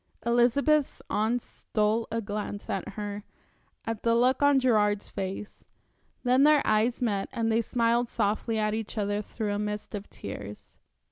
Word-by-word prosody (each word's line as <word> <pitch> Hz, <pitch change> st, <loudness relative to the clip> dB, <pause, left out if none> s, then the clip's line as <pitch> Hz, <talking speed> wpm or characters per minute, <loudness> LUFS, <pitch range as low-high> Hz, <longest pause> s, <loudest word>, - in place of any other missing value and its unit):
Elizabeth's 255 Hz, +5 st, +3 dB
aunts 225 Hz, +3 st, 0 dB
stole 215 Hz, +1 st, -1 dB
a 230 Hz, +1 st, -2 dB
glance 205 Hz, 0 st, -4 dB
at 195 Hz, 0 st, -3 dB
her, 205 Hz, -1 st, -5 dB, 0.6 s
at 225 Hz, -2 st, -3 dB
the 230 Hz, 0 st, +2 dB
look 255 Hz, +3 st, +3 dB
on 285 Hz, -1 st, +5 dB
Gerard's 210 Hz, -5 st, +2 dB
face. 195 Hz, +1 st, -5 dB, 0.6 s
Then 250 Hz, +1 st, +4 dB
their 300 Hz, 0 st, +5 dB
eyes 220 Hz, +4 st, +2 dB
met 200 Hz, -4 st, 0 dB
and 225 Hz, -2 st, 0 dB
they 225 Hz, +1 st, +3 dB
smiled 235 Hz, +1 st, +1 dB
softly 220 Hz, +1 st, 0 dB
at 215 Hz, -1 st, +1 dB
each 220 Hz, 0 st, -4 dB
other 205 Hz, 0 st, 0 dB
through 210 Hz, 0 st, -3 dB
a 205 Hz, -, -2 dB
mist 210 Hz, +1 st, -4 dB
of 205 Hz, 0 st, -6 dB
tears. 100 Hz, +1 st, -9 dB
220 Hz, 155 wpm, -28 LUFS, 210-240 Hz, 0.6 s, on